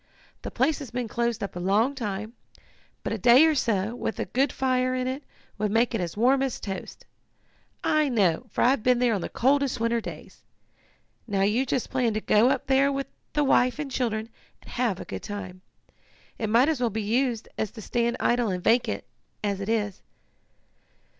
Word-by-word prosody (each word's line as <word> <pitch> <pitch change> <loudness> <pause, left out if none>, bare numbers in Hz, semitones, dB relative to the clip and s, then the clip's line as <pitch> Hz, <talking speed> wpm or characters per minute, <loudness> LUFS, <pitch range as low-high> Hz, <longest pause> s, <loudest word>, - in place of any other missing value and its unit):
The - - -5
place 275 +5 +1
has 280 -5 -7
been 245 -1 -3
closed 235 -1 -1
up 200 - -5
a - - -4
long 205 +9 +2
time, 215 -3 -4 0.7
but - - -2
a 225 - -3
day 245 - +7
or 320 - +4
so, 220 -6 0
with 225 - -3
a - - -1
good 265 +2 +1
fire 255 -1 0
in 255 0 -1
it, 260 +2 -3 0.4
would 210 0 +1
make 230 +4 +2
it 225 - 0
as 175 +2 -4
warm 260 +4 +4
as 270 -3 -1
toast. 195 -2 -7 0.8
I 305 -2 +2
know, 205 -3 +1
for - - 0
I've 255 0 +3
been 250 +2 +3
there 245 -1 +2
on 200 - -1
the - - -4
coldest 275 0 +1
winter 230 0 +1
days. - - -10 0.9
Now 200 -3 0
you 230 +7 +1
just 250 - -1
plan 245 -4 +1
to - - +1
go 220 +3 +4
up - - 0
there 270 +1 +3
with 275 0 -2 0.3
the 295 - +2
wife 255 -2 +3
and 295 -2 -4
children, 225 -3 -1 0.3
and - - -13
have 235 -7 0
a - - -7
good - - -6
time. 185 -3 -7 0.8
It 220 - -1
might 235 +5 +5
as 315 -5 0
well 240 - +2
be 220 0 -3
used 235 +1 0
as 220 - 0
to 220 - -11
stand 235 +2 0
idle 240 -2 +2
and 180 -2 -3
vacant, 225 - +2 0.4
as 200 -1 -1
it 200 - -4
is." 210 -4 -1
235 Hz, 200 wpm, -26 LUFS, 210-260 Hz, 0.9 s, day